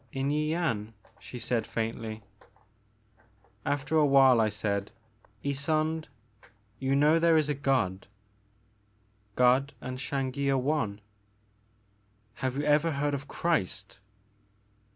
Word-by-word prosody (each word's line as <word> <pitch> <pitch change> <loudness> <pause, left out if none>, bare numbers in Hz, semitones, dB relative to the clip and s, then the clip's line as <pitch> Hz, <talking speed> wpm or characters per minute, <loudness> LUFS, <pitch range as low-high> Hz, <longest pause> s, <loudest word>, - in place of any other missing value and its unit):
'' - - -37
In 135 - 0
Yian," 150 -8 -1 0.3
she 125 - -9
said 120 -1 -1
faintly. 110 -1 -4 1.4
After 145 +2 0
a 155 - +5
while 135 -3 +6
I 110 - +2
said, 100 -1 -2 0.6
Ysonde, 155 +3 0 0.7
you 135 0 +1
know 150 +3 +4
there 165 -1 +4
is 150 -1 +1
a - - +2
God?" 130 -10 0 1.3
God 130 +3 +3
and 130 0 -6
Xangi 140 0 -2
are 135 - +3
one." 130 -7 -1 0.7
*' 105 0 -39
Have 130 0 -1
you 145 - -1
ever 150 +2 +3
heard 145 +1 -1
of 140 0 -4
Christ 100 - -2
135 Hz, 120 wpm, -29 LUFS, 110-145 Hz, 1.4 s, while